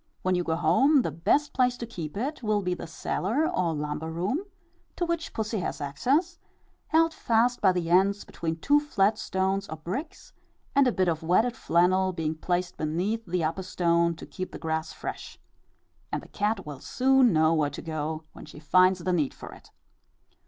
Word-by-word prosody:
When 185 - +2
you 180 -1 +1
go 160 -1 0
home, 250 - +4
the 165 - -2
best 280 - +1
place 250 -1 +2
to 235 - -5
keep 170 -8 -7
it 270 +7 -3
will 210 -3 0
be 180 0 0
the 175 - -7
cellar, 225 - -1
or 170 -3 0
lumber 150 +2 -3
room, 180 - -1 0.6
to 350 - -1
which 335 -1 -2
pussy 220 -1 -2
has - - -3
access, 275 - 0 0.5
held 325 0 +3
fast 240 -2 +1
by 195 -3 +5
the 175 -2 -2
ends 195 +3 +3
between 160 -1 -4
two 290 - +3
flat 215 -8 +1
stones 190 +1 -1
or 160 - -5
bricks, 185 - -6 0.4
a 275 -3 +5
bit 185 -4 +1
of 165 -1 0
wetted 215 +9 +2
flannel 185 -1 +2
being 160 -2 -2
placed 175 +2 -2
beneath 180 +9 -1
the 175 -1 -1
upper 160 +4 -1
stone 170 -2 +1
to - - -10
keep 185 -1 -6
the - - -7
grass 160 0 -2
fresh; - - -7 0.7
and - - -3
the - - -14
cat 205 -1 -1
will 145 -3 -7
soon 260 - +3
know 160 -1 +4
where 155 -3 +2
to 140 - -8
go 155 0 -3
when - - -11
she 150 - -12
finds 185 +4 +3
the 180 +1 0
need 155 -6 0
for - - -10
it. - - -16
185 Hz, 190 wpm, -27 LUFS, 160-230 Hz, 0.7 s, by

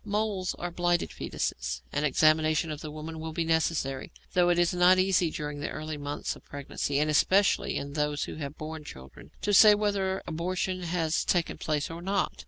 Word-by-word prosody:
Moles 205 -3 -1
are 175 0 -5
blighted 175 0 0
foetuses. - - -3
An - - 0
examination 155 +2 +3
of 150 - -6
the 155 - -6
woman 155 +1 -7
will 160 0 -5
be 170 - 0
necessary, 160 -5 0 0.2
though 175 -1 +4
it 175 - +3
is 175 0 +2
not 180 +1 +5
easy 185 -2 +3
during 150 -1 -5
the - - -3
early 155 0 -5
months 145 0 -4
of - - -16
pregnancy, 140 0 -3
and 150 +1 +2
especially 190 +6 +3
in 140 0 -5
those 150 -1 0
who - - -6
have 145 -1 -6
borne 155 0 -6
children, 65 - -12
to 205 - +1
say 210 +1 +8
whether 200 -2 -1
abortion 185 +3 -2
has 165 -2 0
taken 175 -3 0
place 150 0 -1
or 165 +1 -7
not. 195 +2 0
160 Hz, 190 wpm, -28 LUFS, 150-180 Hz, 0.2 s, say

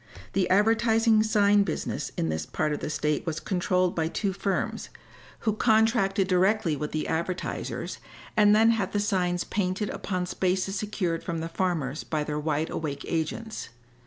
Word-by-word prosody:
The 190 -2 +1
advertising 225 +2 +4
sign 205 -1 +4
business 200 - -2
in 80 - 0
this 80 0 -2
part 155 -1 -1
of 145 - -3
the - - -4
state 150 -1 0
was 165 0 -1
controlled 180 -1 +1
by 160 -1 0
two 195 +3 -1
firms, 195 0 -2 0.5
who 215 - +1
contracted 220 -3 +3
directly 185 -2 +2
with 150 +1 -4
the 155 - -2
advertisers 170 +3 -3 0.4
and 210 -1 +6
then 225 +1 +6
had 200 -4 -1
the 205 - +1
signs 180 -3 0
painted 195 +1 -1
upon 185 -2 -3
spaces 185 +1 -1
secured 190 -5 -2
from 170 -2 -3
the 165 +1 -4
farmers 165 -6 -1
by 155 -2 -2
their 150 0 -3
wide 155 +1 -1
awake 140 -3 -4
agents. 175 +7 -3
185 Hz, 160 wpm, -27 LUFS, 160-210 Hz, 0.5 s, and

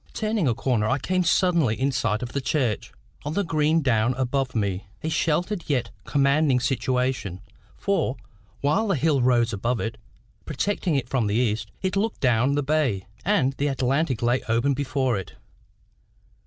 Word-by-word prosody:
Turning 215 -6 0
a 120 - +1
corner, 115 -3 0
I 130 - +2
came 185 +6 0
suddenly 170 - +2
in 135 +1 +1
sight 115 -3 0
of 120 - -5
the 140 - -1
church, 125 -6 -1 0.3
on 145 +2 -3
the 200 - +1
green 155 -1 +1
down 120 -1 +2
above 130 0 -1
me 100 -2 -1 0.2
a 160 - -1
sheltered 170 +4 0
yet 135 -5 0
commanding 140 -1 +3
situation; 125 -5 -1 0.4
for, 195 -10 0 0.4
while 195 +11 +2
the 195 - +2
hill 145 -1 +2
rose 120 -2 +3
above 115 +4 -1
it, 110 -1 -4 0.4
protecting 175 +2 -1
it 135 -3 -1
from 125 -4 0
the 100 - 0
east, 110 -3 0
it 190 +1 0
looked 215 +3 -1
down 125 +2 +2
the 145 - +1
bay, 135 - 0 0.2
and 155 -10 +2
the 145 - +1
Atlantic 135 -1 0
lay 120 +2 +2
open 120 +5 +2
before 130 -4 0
it. 95 - -9
135 Hz, 170 wpm, -25 LUFS, 120-155 Hz, 0.4 s, commanding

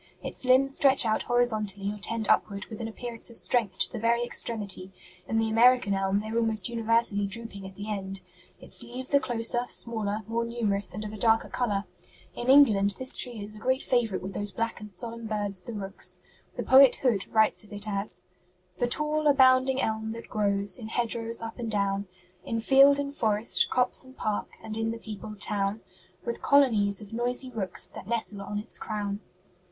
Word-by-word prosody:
Its - - -6
limbs 270 +2 +4
stretch 270 -3 +5
out 220 -1 +1
horizontally 215 -5 0
or 210 - -9
tend 220 +1 -2
upward 200 -2 +1
with 220 - -7
an 225 - -3
appearance 230 +1 -5
of 235 - -6
strength 220 -6 +1
to - - +1
the 235 - -5
very 235 +2 +2
extremity; 205 -6 -2 0.4
in 225 - -1
the 225 0 +2
American 230 -1 +4
elm 195 +1 0
they 215 - -7
are 225 - -2
almost 220 -4 +1
universally 230 -3 +1
drooping 200 -2 -6
at 190 - -13
the 205 +2 -7
end. 195 -2 -4 0.4
Its - - -5
leaves 250 +3 -3
are 280 - +7
closer, 240 -2 +2
smaller, 220 -3 -1
more 230 +1 -1
numerous 215 -5 -1
and 210 +4 -6
of 210 - -6
a - - -7
darker 225 +1 +3
color. 205 -5 -1 0.5
In 240 +1 -4
England 210 -8 +6
this 260 0 -2
tree 235 -5 -3
is 210 +1 -9
a 215 - -11
great 260 +4 0
favorite 225 -7 0
with 195 +1 -6
those 205 +2 -1
black 230 +3 -3
and 210 - -8
solemn 230 +4 -6
birds 205 -3 -3
the - - -8
rooks. 195 -2 -2 0.4
The - - -2
poet 265 0 +7
Hood 230 -8 0
writes 220 -1 +3
of 210 - -18
it 205 +1 -2
as 200 0 -3 0.6
"'The 245 - +2
tall, 300 +4 +1
abounding 260 -1 +5
elm 220 0 -2
that 230 - -10
grows 200 0 +1
In 220 - -7
hedgerows 230 0 -2
up 225 +2 -7
and 230 -2 -3
down, 200 -1 -1 0.4
In 230 - -2
field 275 +4 +6
and 285 0 -3
forest, 220 -4 +2
copse 250 0 +1
and 260 0 -16
park, 215 -1 -2
And 220 -1 -5
in 225 0 -1
the 230 - -3
peopled 215 -2 -9
town, 200 +1 -2 0.4
With 475 - -4
colonies 220 -8 +3
of 210 +1 -11
noisy 245 +2 -1
rooks 195 -6 -2
That - - -10
nestle 220 -3 0
on 205 +1 -5
its 210 +3 -4
crown.' 205 -2 -3
225 Hz, 195 wpm, -27 LUFS, 205-240 Hz, 0.6 s, are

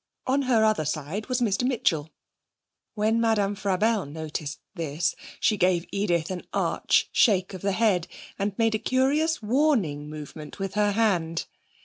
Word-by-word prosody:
On 270 +2 +2
her 225 -3 +4
other 215 -7 +2
side 155 +8 -3
was 255 -1 -1
Mr 215 -3 +1
Mitchell. 180 - 0 0.9
When 220 +2 +2
Madame 210 -3 +2
Frabelle 205 0 0
noticed 150 -1 -5
this, 165 -3 -1 0.2
she 215 - +2
gave 180 -2 +2
Edith 175 -4 0
an 185 - -4
arch - - +2
shake 195 -5 +3
of 185 - -7
the 200 0 0
head, 190 -5 +2 0.3
and 200 0 -2
made 225 -1 +2
a 215 - 0
curious 275 +5 +1
warning 210 - +1
movement 150 0 -9
with 195 -1 -4
her 205 0 +2
hand. 175 -7 +1
200 Hz, 150 wpm, -26 LUFS, 165-225 Hz, 0.9 s, her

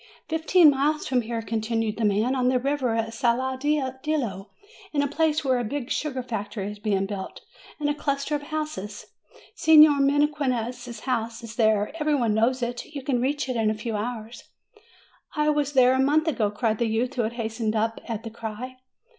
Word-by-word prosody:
"Fifteen 320 0 +5
miles 290 +3 0
from 255 -2 +1
here," 230 0 -4
continued 225 0 -1
the 225 - 0
man, 210 +5 +2
"on 255 -2 +1
the 255 - +3
river 260 -2 0
at 225 0 -2
Saladillo, 260 -2 -1 0.4
in 285 -1 +2
a - - +1
place 310 +1 0
where 260 -2 +2
a - - -1
big 250 +2 -4
sugar 265 -4 -2
factory 205 -3 -4
is 210 - -10
being 200 -2 0
built, 195 -1 -6 0.4
and 295 - 0
a 295 - +2
cluster 280 0 -2
of 295 - 0
houses. 300 -9 -5 0.5
Signor 305 -2 +7
Mequinez's 255 -5 0
house 230 -2 -2
is 225 -1 -8
there; 215 -2 +2
every 300 0 +2
one 235 -6 +1
knows 240 +4 +1
it: 240 0 -3
you 285 -3 -7
can 255 -3 0
reach 285 +2 -1
it 255 - -2
in 220 -2 +2
a 215 - 0
few 215 +1 -4
hours." 225 +1 -5 0.9
"I 300 -1 +2
was 295 -1 0
there 255 -1 +5
a 260 - +1
month 300 +4 +3
ago," 225 -9 +1
said 225 -2 0
a 235 - +2
youth, 230 +4 -1
who 255 - 0
had 225 +1 -2
hastened 225 -1 -2
up 225 +1 -1
at 225 -2 -4
the 225 - -7
cry. 230 +3 -7
245 Hz, 190 wpm, -25 LUFS, 225-285 Hz, 0.9 s, Signor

